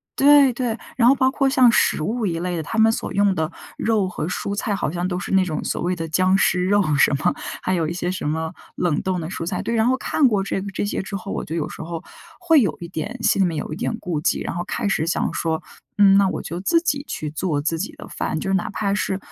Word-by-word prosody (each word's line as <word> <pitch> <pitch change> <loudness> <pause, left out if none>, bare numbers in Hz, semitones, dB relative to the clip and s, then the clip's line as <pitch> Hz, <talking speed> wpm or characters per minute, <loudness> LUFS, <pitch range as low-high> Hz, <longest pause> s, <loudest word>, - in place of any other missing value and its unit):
对 280 -2 +6
对， 240 -2 -2 0.2
然 245 -1 +5
后 275 - +6
包 260 0 +2
括 275 -1 +1
像 255 -3 +5
食 155 - +2
物 220 +4 -1
一 165 -2 -1
类 175 0 -2
的， - - -1
他 225 +8 -5
们 220 0 +5
所 - - -4
用 200 -1 +3
的， 160 -1 -2 0.3
肉 215 -4 +1
和 175 -3 -4
蔬 190 +2 -3
菜 205 0 -1
好 195 - -2
像 175 +2 -2
都 180 -1 -2
是 195 - -5
那 190 -1 +5
种 155 -4 -3
所 - - -2
谓 180 +1 0
的 165 -1 -4
僵 185 +4 +3
尸 180 -1 +2
肉 205 0 +3
什 - - +4
么， 175 +5 +1 0.3
还 185 - 0
有 165 -3 0
一 170 - -3
些 180 0 -2
什 185 -5 -3
么， 160 +2 -2 0.2
冷 170 -5 0
冻 185 -1 -1
的 160 - -4
蔬 165 - -4
菜， 180 0 -2
对。 230 - -2
然 225 +1 +3
后 260 - +2
看 285 +1 +2
过 205 -5 +1
这 195 - -2
个 200 - -5
这 195 - -2
些 205 - -2
之 195 +1 -6
后， 195 +1 -6
我 - - -3
就 160 - -5
有 160 -3 -1
时 - - -9
候 165 0 -6 0.4
会 325 -5 +5
有 210 - 0
一 170 - -5
点 195 +8 -5
心 - - +3
里 190 - +4
面 165 -3 -3
有 150 - -4
一 - - -4
点 225 - -2
顾 175 -8 -3
忌。 - - 0
然 - - -3
后 175 - -2
开 225 -4 -2
始 160 -5 +1
想 175 - 0
说， 160 -1 -1 0.4
嗯， 195 -1 +6
那 200 -1 +4
我 - - -3
就 170 +2 -5
自 330 - +3
己 285 -5 -1
去 150 - -4
做 155 -2 -1
自 165 +3 -1
己 200 - -4
的 - - -9
饭， - - -3
就 190 - -3
是 - - +1
哪 195 +3 0
怕 200 -1 -1
是 195 -2 -1
190 Hz, 300 characters per minute, -22 LUFS, 170-220 Hz, 0.4 s, 对